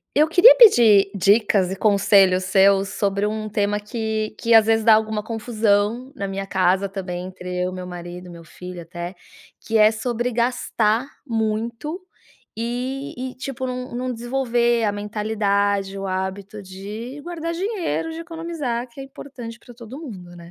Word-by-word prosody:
Eu 300 +2 +5
queria 355 +10 +8
pedir 225 - +7
dicas 200 -1 +3
e 190 - -4
conselhos 195 -2 +4
seus 195 +1 +4
sobre 200 0 -1
um 215 0 -3
tema 205 -1 0
que 220 0 -3
que 235 -1 +2
às 220 -1 +7
vezes 225 0 +2
dá 225 -1 +7
alguma 220 0 0
confusão 220 +1 0
na 200 - -3
minha 195 0 -4
casa 190 +1 +1
também, 185 -2 -5
entre 180 -1 -7
eu, 180 - -3
meu 185 0 -7
marido 175 0 -8
e - - -11
meu 170 -1 -11
filho 180 +2 -9
até, 175 +2 -7 0.5
que 225 - -2
é 215 0 +6
sobre 240 +2 -2
gastar 235 -1 0 0.2
muito 230 - -2 0.6
e 250 +4 -4 0.2
e, - - -19
tipo, 260 0 -5
n 250 0 -5
não 255 +1 -3
desenvolver 240 -1 0
a 205 - +1
mentalidade, 205 -1 -1
o 195 - -4
hábito 190 +2 -4
de 210 +8 -8
guardar 335 -1 -5
dinheiro, 370 -4 -2
de 320 - -7
economizar, 325 -8 -4
que 235 - -12
é 270 - -6
importante 250 -4 -10
pra 245 +1 -15
todo 240 +4 -10
mundo, 185 - -10
né? 170 0 -13
215 Hz, 165 wpm, -22 LUFS, 195-245 Hz, 0.6 s, queria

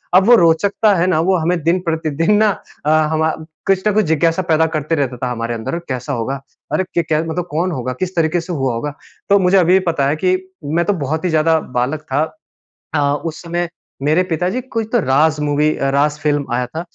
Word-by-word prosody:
अब 190 +1 +6
वो 240 - +8
रोचकता 200 +4 +3
है 175 +1 +1
ना 165 -4 +2
वो 185 +3 +2
हमें 170 +1 0
दिन 170 +3 +2
प्रतिदिन 160 +3 0
ना 215 0 +4 0.4
अ, - - +1 0.2
हमा 160 0 +1 0.4
कुछ 195 +1 +2
न 210 - +2
कुछ 215 -3 +2
जिज्ञासा 165 +3 +2
पैदा 160 +1 +4
करते 155 +2 0
रहता 135 -4 -1
था 125 0 -3
हमारे 115 0 -3
अंदर 115 +9 -3
कैसा 130 +2 -3
होगा? 130 +3 -3 0.3
अरे! 190 - +2
क 170 - +3
क्या 155 0 +1
मतलब 170 +2 -3
कौन 175 +4 0
होगा? 125 -3 -3
किस 185 0 -3
तरीके 165 +1 +1
से 175 +1 -6
हुआ 135 -5 -1
होगा? 145 +5 -4 0.4
तो 200 0 +5
मुझे 190 +1 +3
अभी 185 +1 +5
पता 140 -4 +1
है 145 - +1
कि 185 +3 +1 0.3
मैं 160 +4 0
तो 205 - +2
बहुत 155 +1 -3
ही - - +2
ज़्यादा 160 0 +3 0.2
बालक 140 +5 -1
था। 145 +3 +2 0.7
अ, - - +2 0.3
उस 155 -1 -5
समय 170 0 -2 0.3
मेरे 155 +5 +3
पिताजी 180 +9 -1
कोई 230 -3 -3
तो 240 - +4
राज़ 150 0 +2
मूवी 150 +1 +1
अ, 135 - 0
राज़ 145 +2 +1
फ़िल्म 145 -2 0
आया 125 0 0
था 160 +6 -5
160 Hz, 220 wpm, -18 LUFS, 145-180 Hz, 0.7 s, वो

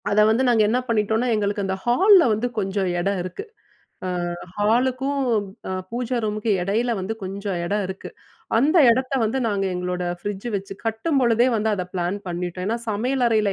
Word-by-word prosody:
அத 205 - +2
வந்து, 230 +4 +2
நாங்க 235 -3 +4
என்ன 230 +4 +2
பண்ணிட்டோனா, 220 0 +1
எங்களுக்கு 205 -1 0
அந்த 190 0 -1
ஹால்ல 370 - +6
வந்து, 215 +3 0
கொஞ்சம் 195 -1 -1
எடம் 195 +2 0
இருக்கு. 185 - -6 0.8
அ, - - -2 0.3
ஹாலுக்கும் 255 +6 +1 0.5
அ, - - -4 0.2
பூஜா 245 +1 -2
ரூமுக்கு 215 +1 -1
எடயில 225 +6 0
வந்து, 195 +4 -3
கொஞ்சம் 195 0 -4
எடம் 205 +3 0
இருக்கு. 190 +1 -7 0.5
அந்த 295 +8 +3
எடத்த 255 +3 0
வந்து, 225 +5 0
நாங்க 200 -3 0
எங்களோட 180 0 -3 0.2
ஃப்ரிட்ஜு 205 +5 -5
வச்சு, 195 0 -6
கட்டும்பொழுதே 235 0 +2
வந்து 220 0 0
அத 185 -3 -3
பிளான் 180 +2 -1
பண்ணிட்டோம். 175 +1 -4
ஏன்னா, 230 +3 0
சமையல் 245 +5 0
அறையில 215 -3 +2
215 Hz, 165 wpm, -23 LUFS, 195-240 Hz, 0.8 s, ஹால்ல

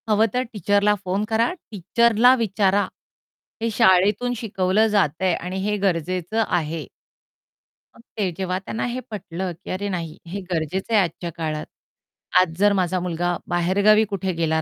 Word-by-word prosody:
हवं 215 +1 +4
तर 250 +1 +1
टीचरला 205 +1 +2
फोन 190 +3 0
करा, 230 +1 +2 0.2
टीचरला 230 +5 +4
विचारा. 200 -4 +1 0.7
हे 230 - 0
शाळेतून 210 +2 +3
शिकवलं 210 -1 +1
जातंय 185 -3 +1
आणि 180 +3 -4
हे 210 0 +1
गरजेचं 185 +2 0
आहे. 160 -2 -2 1.1
मग - - -17 0.2
ते 195 -4 0
जेव्हा 185 -1 -1
त्यांना 205 +3 -5
हे 245 +1 -3
पटलं, 185 -3 -4
की - - -10
"अरे 200 +2 -3
नाही 170 -3 -4
हे 195 +4 -5
गरजेचं 180 +6 -2
आहे 210 - +6
आजच्या 170 0 -5
काळात, 155 -2 -3 0.8
आज 165 -3 -1
जर 205 0 +5
माझा 185 -1 0
मुलगा 175 0 -1
बाहेरगावी 195 +5 +4
कुठे 190 -2 -2
गेला 160 -1 0
190 Hz, 150 wpm, -22 LUFS, 175-210 Hz, 1.1 s, आहे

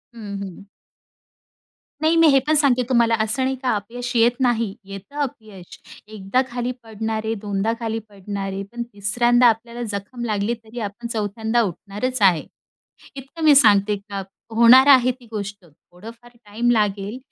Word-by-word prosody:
हं, 205 -3 -7
हं. 195 -1 -8 1.4
नाही, 315 +1 +3
मी 330 -1 +6
हे 275 - +5
पण 310 - +3
सांगते 270 -4 +3
तुम्हाला 235 -2 +3
असं 220 +5 -1
नाही 265 +1 0
का 255 - +1
अपयश 240 +4 -5
येत 235 +1 +5
नाही. 230 -5 +1
येतं 195 +7 -11
अपयश, 215 -9 -7 0.3
एकदा 215 +3 -1
खाली 245 +1 -3
पडणार 220 0 -4
आहे, 220 - -1
दोनदा 205 +1 -1
खाली 225 -1 -3
पडणार 200 0 -6
आहे 195 +1 -4
पण 240 0 -4
तिसऱ्यांदाआपल्याला 235 +3 +2
जखम 205 +5 -6
लागली 210 0 -1
तरी 225 +2 -9
आपण 215 +2 -5
चौथ्यांदा 220 +1 -1
उठणारच 210 +6 -3
आहे. 180 -6 +4 0.7
इतकं 275 +5 -9
मी 300 -2 +6
सांगते 210 -5 +5
का 200 -1 -4 0.3
होणार 245 +4 +7
आहे 255 0 +2
ती 250 -1 -15
गोष्ट. 200 -3 -6
थोडंफार 220 +9 -15
टाईम 225 +4 -1
लागेल, 210 0 0
225 Hz, 155 wpm, -21 LUFS, 200-245 Hz, 1.4 s, होणार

